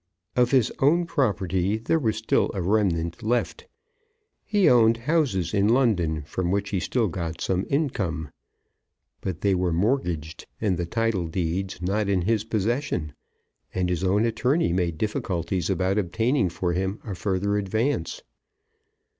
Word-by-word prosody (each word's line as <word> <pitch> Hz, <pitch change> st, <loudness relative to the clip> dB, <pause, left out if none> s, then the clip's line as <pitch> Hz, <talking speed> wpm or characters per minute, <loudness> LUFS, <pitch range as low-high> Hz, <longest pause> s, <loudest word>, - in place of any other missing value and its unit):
Of 125 Hz, -1 st, +3 dB
his 130 Hz, -4 st, +3 dB
own 165 Hz, +6 st, +3 dB
property 100 Hz, -, 0 dB
there 115 Hz, +9 st, 0 dB
was 110 Hz, -6 st, 0 dB
still 110 Hz, -, +1 dB
a 95 Hz, -, -1 dB
remnant 85 Hz, -4 st, 0 dB
left. 120 Hz, -, -1 dB, 0.8 s
He 205 Hz, -3 st, +2 dB
owned 115 Hz, -2 st, +5 dB
houses 120 Hz, -, 0 dB
in 100 Hz, 0 st, +3 dB
London 95 Hz, -, +2 dB
from 85 Hz, +4 st, -3 dB
which 100 Hz, +1 st, -1 dB
he 95 Hz, -, 0 dB
still 115 Hz, +5 st, 0 dB
got 85 Hz, -2 st, -4 dB
some 95 Hz, 0 st, -1 dB
income. 95 Hz, -, -1 dB, 0.9 s
But 90 Hz, -2 st, -4 dB
they 100 Hz, -1 st, +2 dB
were 90 Hz, -1 st, +1 dB
mortgaged, 85 Hz, -, -1 dB
and 100 Hz, -4 st, +1 dB
the 85 Hz, 0 st, -3 dB
title 115 Hz, -3 st, 0 dB
deeds 90 Hz, +3 st, -3 dB
not 100 Hz, +2 st, 0 dB
in 95 Hz, -3 st, +1 dB
his 110 Hz, +2 st, +1 dB
possession, 110 Hz, -, -1 dB, 0.6 s
and 90 Hz, -1 st, 0 dB
his 90 Hz, 0 st, -1 dB
own 100 Hz, +4 st, +2 dB
attorney 125 Hz, -, +1 dB
made 85 Hz, -3 st, 0 dB
difficulties 90 Hz, -3 st, -2 dB
about 95 Hz, +1 st, +1 dB
obtaining 110 Hz, +4 st, +1 dB
for 85 Hz, +1 st, -2 dB
him 95 Hz, +4 st, -2 dB
a 105 Hz, -, -4 dB
further 100 Hz, +2 st, -1 dB
advance. 110 Hz, -, -1 dB
100 Hz, 145 wpm, -25 LUFS, 90-115 Hz, 0.9 s, owned